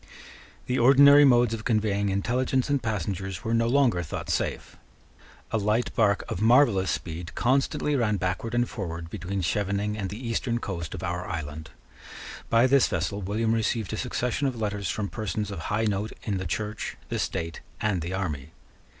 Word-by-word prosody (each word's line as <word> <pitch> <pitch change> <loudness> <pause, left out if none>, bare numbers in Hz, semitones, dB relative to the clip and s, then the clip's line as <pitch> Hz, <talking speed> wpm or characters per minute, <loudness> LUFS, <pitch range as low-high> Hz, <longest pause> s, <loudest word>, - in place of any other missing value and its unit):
The 125 +1 0
ordinary 140 +3 +8
modes 120 -3 +4
of 110 -1 -4
conveying 105 -3 +1
intelligence 125 +7 0
and 140 -2 +2
passengers 95 -4 -3
were 115 - -1
no 115 0 +2
longer 125 -8 +3
thought 80 - -5
safe. - - -2 0.8
A 110 - +1
light 105 +4 0
bark 100 -4 +2
of 90 - -4
marvellous 115 -5 +4
speed 85 0 -4
constantly 140 +3 +1
ran 105 -5 +1
backward 95 +6 -2
and 120 0 +2
forward 85 -5 -6
between 95 -1 -3
Schevening 100 +3 -1
and 100 -3 -3
the 105 - -6
eastern 115 +1 -1
coast 85 -8 -5
of - - -7
our 90 +1 -3
island. 80 -2 -5 0.8
By 115 +2 +5
this 135 0 +4
vessel 90 +4 -2
William 110 +4 0
received 110 -2 -1
a - - -2
succession 125 +3 -1
of 125 -3 -3
letters 105 -4 -2
from 105 -2 -2
persons 105 -1 -3
of 100 - -5
high 110 +2 +1
note 105 +1 -1
in 100 -3 -1
the 95 - -4
Church, 105 +4 -4
the - - -2
state, 85 0 -3 0.2
and 100 -5 0
the 85 +3 -4
army. 80 -6 -4
105 Hz, 175 wpm, -26 LUFS, 95-120 Hz, 0.8 s, ordinary